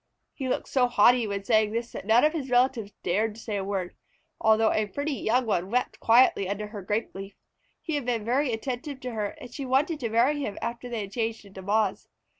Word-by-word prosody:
He 265 Hz, -3 st, -4 dB
looked -, -, -1 dB
so 255 Hz, -2 st, +2 dB
haughty 240 Hz, 0 st, +4 dB
when 200 Hz, -1 st, -3 dB
saying 215 Hz, 0 st, +2 dB
this 235 Hz, +1 st, -3 dB
that -, -, -8 dB
none 225 Hz, +2 st, +5 dB
of 305 Hz, +1 st, +4 dB
his 285 Hz, -5 st, -4 dB
relatives 245 Hz, -4 st, +2 dB
dared 210 Hz, +4 st, 0 dB
to -, -, -11 dB
say 220 Hz, -2 st, -4 dB
a 195 Hz, -, -2 dB
word, 190 Hz, -2 st, -3 dB, 0.4 s
although 220 Hz, 0 st, +4 dB
a 215 Hz, -1 st, 0 dB
pretty 285 Hz, +8 st, -3 dB
young 250 Hz, -1 st, +1 dB
one 185 Hz, -4 st, -1 dB
wept 250 Hz, +3 st, -1 dB
quietly 225 Hz, -5 st, +4 dB
under 210 Hz, +1 st, -3 dB
her 210 Hz, -2 st, -7 dB
grape 210 Hz, +4 st, -2 dB
leaf. 195 Hz, +1 st, -8 dB, 0.5 s
He 320 Hz, -, -3 dB
had 290 Hz, -4 st, -1 dB
been 230 Hz, -4 st, -1 dB
very 260 Hz, +3 st, +1 dB
attentive 255 Hz, +4 st, -4 dB
to 250 Hz, -, -4 dB
her, 215 Hz, -3 st, -2 dB
and 250 Hz, -, -11 dB
she 280 Hz, -, -5 dB
wanted 275 Hz, +5 st, +1 dB
to 235 Hz, -5 st, -2 dB
marry 245 Hz, +7 st, +2 dB
him 210 Hz, -8 st, -4 dB
after 240 Hz, +1 st, -5 dB
they 235 Hz, -2 st, -3 dB
had 195 Hz, -1 st, -7 dB
changed 225 Hz, -1 st, -3 dB
into 195 Hz, -1 st, -11 dB
Moths. 205 Hz, +1 st, 0 dB
225 Hz, 230 wpm, -27 LUFS, 210-255 Hz, 0.5 s, none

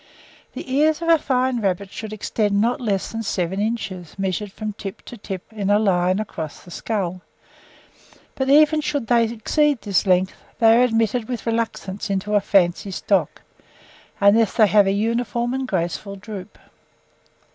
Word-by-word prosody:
The -, -, -7 dB
ears 305 Hz, +2 st, +3 dB
of 335 Hz, -, -1 dB
a 330 Hz, -1 st, +6 dB
fine 255 Hz, -3 st, 0 dB
rabbit 195 Hz, -1 st, -2 dB
should 220 Hz, -1 st, -7 dB
extend 210 Hz, -1 st, -1 dB
not 235 Hz, +4 st, +1 dB
less 200 Hz, -5 st, -1 dB
than 225 Hz, 0 st, -4 dB
seven 190 Hz, -3 st, -2 dB
inches, 205 Hz, -6 st, -3 dB
measured 195 Hz, +1 st, -2 dB
from 215 Hz, +1 st, -5 dB
tip 200 Hz, -1 st, -8 dB
to -, -, -9 dB
tip 195 Hz, -4 st, -6 dB
in 205 Hz, -3 st, -3 dB
a 205 Hz, -, +5 dB
line 185 Hz, -3 st, +2 dB
across 160 Hz, -8 st, -6 dB
the 175 Hz, -, -14 dB
skull; 185 Hz, -3 st, -3 dB, 1.1 s
but 265 Hz, 0 st, -2 dB
even 305 Hz, +2 st, +5 dB
should 285 Hz, -4 st, -2 dB
they 235 Hz, 0 st, +3 dB
exceed 245 Hz, +5 st, 0 dB
this 200 Hz, -1 st, +1 dB
length, 185 Hz, 0 st, +3 dB, 0.2 s
they 225 Hz, -1 st, +6 dB
are 240 Hz, -, +5 dB
admitted 225 Hz, -1 st, 0 dB
with 245 Hz, -2 st, -4 dB
reluctance 225 Hz, -4 st, -3 dB
into 200 Hz, +1 st, -2 dB
a 205 Hz, -, +4 dB
fancy 195 Hz, -1 st, +2 dB
stock, 190 Hz, +2 st, -1 dB, 0.8 s
unless 205 Hz, +1 st, +4 dB
they 220 Hz, -, +6 dB
have 205 Hz, -1 st, +4 dB
a -, -, +3 dB
uniform 235 Hz, +3 st, -1 dB
and 265 Hz, 0 st, -2 dB
graceful 190 Hz, +1 st, -3 dB
droop. 205 Hz, 0 st, -9 dB
210 Hz, 165 wpm, -22 LUFS, 195-235 Hz, 1.1 s, a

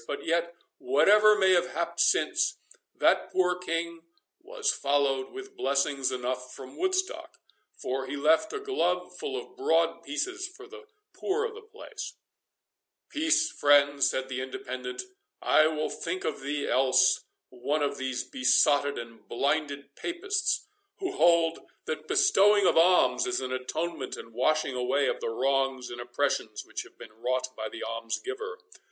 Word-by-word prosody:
But 145 Hz, -, -5 dB
yet, 170 Hz, +1 st, 0 dB, 0.2 s
whatever 210 Hz, +10 st, +5 dB
may 190 Hz, -2 st, +4 dB
have 175 Hz, -1 st, +1 dB
happed -, -, -3 dB
since, -, -, +2 dB, 0.4 s
that -, -, +2 dB
poor 180 Hz, -1 st, +2 dB
King 170 Hz, -1 st, -3 dB, 0.4 s
was 450 Hz, -3 st, -1 dB
followed 140 Hz, -1 st, 0 dB
with 395 Hz, 0 st, -10 dB
blessings 140 Hz, -, 0 dB
enough 125 Hz, 0 st, -3 dB
from 130 Hz, -1 st, -11 dB
Woodstock, 375 Hz, +1 st, -2 dB, 0.4 s
for 130 Hz, +1 st, -3 dB
he 140 Hz, -, -4 dB
left 160 Hz, -, +3 dB
a 425 Hz, -, -4 dB
glove 410 Hz, 0 st, -1 dB
full 420 Hz, -3 st, -3 dB
of 440 Hz, -2 st, -13 dB
broad 405 Hz, +3 st, +1 dB
pieces 370 Hz, 0 st, -3 dB
for 370 Hz, +2 st, -13 dB
the 450 Hz, +1 st, -13 dB, 0.3 s
poor 430 Hz, +4 st, -1 dB
of 455 Hz, -, -4 dB
the 445 Hz, -, -11 dB
place"— 440 Hz, +1 st, -9 dB, 0.9 s
"Peace, 320 Hz, +2 st, +2 dB
friend," 145 Hz, -1 st, +4 dB
said 130 Hz, 0 st, +1 dB
the 130 Hz, -1 st, -4 dB
Independent; 380 Hz, -, -5 dB, 0.4 s
"I 155 Hz, 0 st, +4 dB
will 155 Hz, -1 st, -2 dB
think 180 Hz, +2 st, -4 dB
thee 145 Hz, 0 st, -3 dB
else 130 Hz, 0 st, +3 dB, 0.3 s
one 140 Hz, +4 st, -2 dB
of 145 Hz, -, -2 dB
those 130 Hz, -1 st, -2 dB
besotted 140 Hz, +2 st, +3 dB
and 115 Hz, -1 st, -9 dB
blinded 140 Hz, +1 st, -1 dB
Papists, 395 Hz, +6 st, -1 dB, 0.3 s
who 375 Hz, -1 st, -3 dB
hold, 170 Hz, -, +3 dB, 0.3 s
that 155 Hz, 0 st, -5 dB
bestowing 205 Hz, 0 st, +4 dB
of -, -, +4 dB
alms 180 Hz, +2 st, +4 dB
is 125 Hz, -, 0 dB
an 130 Hz, -1 st, -4 dB
atonement 145 Hz, +3 st, -4 dB
and 115 Hz, -, -11 dB
washing 135 Hz, +4 st, +1 dB
away 130 Hz, +3 st, +1 dB
of -, -, -1 dB
the -, -, -3 dB
wrongs 135 Hz, +1 st, 0 dB
and 120 Hz, 0 st, -6 dB
oppressions 120 Hz, 0 st, -2 dB
which -, -, -5 dB
have -, -, -15 dB
been -, -, -12 dB
wrought 130 Hz, +3 st, -2 dB
by 110 Hz, 0 st, -4 dB
the -, -, -7 dB
almsgiver. 380 Hz, -, -4 dB
155 Hz, 150 wpm, -28 LUFS, -, 0.9 s, whatever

